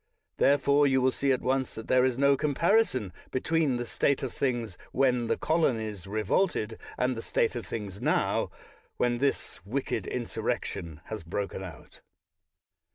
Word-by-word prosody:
Therefore 140 +1 +4
you 130 -1 +3
will 130 0 +3
see 135 +1 +1
at 130 - 0
once 130 0 0
that 110 - -7
there 130 0 +4
is 130 -2 +1
no 140 0 +5
comparison 145 - +2 0.2
be 130 - -1
tween 160 -4 +1
the 120 - -3
state 140 +3 +1
of 130 - -3
things 120 -7 -1 0.2
when 125 -3 +2
the - - +1
Colonies 110 - 0
re 110 +2 -2
volted, 110 - 0 0.2
and 125 0 +1
the 115 - -4
state 115 +1 0
of 120 - -5
things 100 -3 -5
now, - - +1 0.5
when 120 -1 +1
this 140 -8 -1
wicked 130 +8 -2
insurrection 85 -9 -3
has 110 -2 -6
broken 95 +3 -4
out. 85 -5 -11
125 Hz, 160 wpm, -29 LUFS, 110-140 Hz, 0.5 s, no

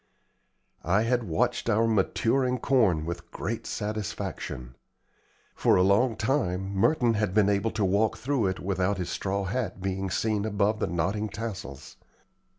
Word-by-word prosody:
I 95 +6 +2
had 120 0 +1
watched 80 -2 0
our 110 +2 +3
maturing 120 +4 +1
corn 110 - +2
with 85 +1 -6
great - - -4
satisfaction. 100 - -4 0.8
For - - +3
a 90 - +4
long 110 +5 +3
time 100 -6 -1
Merton 120 +4 +3
had 105 -3 -1
been 105 -2 +4
able 100 +2 +1
to 110 -2 -1
walk 105 +4 +2
through 125 -2 0
it 95 0 -2
without 95 +1 0
his 90 -2 -3
straw 100 0 -2
hat 100 -1 -3
being 95 0 -2
seen 105 +2 0
above 105 0 +1
the - - 0
nodding 100 +6 -1
tassels. 100 - -7
100 Hz, 150 wpm, -27 LUFS, 95-110 Hz, 0.8 s, a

